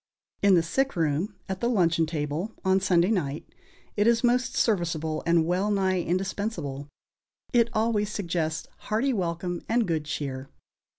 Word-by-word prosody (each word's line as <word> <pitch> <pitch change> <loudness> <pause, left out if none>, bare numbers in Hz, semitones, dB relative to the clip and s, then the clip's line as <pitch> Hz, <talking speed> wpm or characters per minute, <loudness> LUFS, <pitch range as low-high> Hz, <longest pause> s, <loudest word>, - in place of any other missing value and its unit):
In 200 -2 +6
the 170 - +4
sick 270 +10 0
room, 165 +5 0
at 190 -1 -4
the 235 - +1
luncheon 170 -7 +2
table, 155 +6 -3
on 190 0 +4
Sunday 185 0 +3
night, 150 -8 -1 0.5
it 205 +1 +2
is 235 0 +3
most 250 +1 +2
serviceable 165 -7 0
and 170 -1 +4
wellnigh 190 +1 +1
indispensable; 180 -6 -3 0.7
it 235 -1 +4
always 215 -2 +1
suggests 170 -5 -2 0.2
hearty 235 +6 +1
welcome 175 -2 -2
and 230 -2 +2
good 160 -3 -1
cheer. 135 -3 -4
185 Hz, 140 wpm, -27 LUFS, 160-210 Hz, 0.7 s, In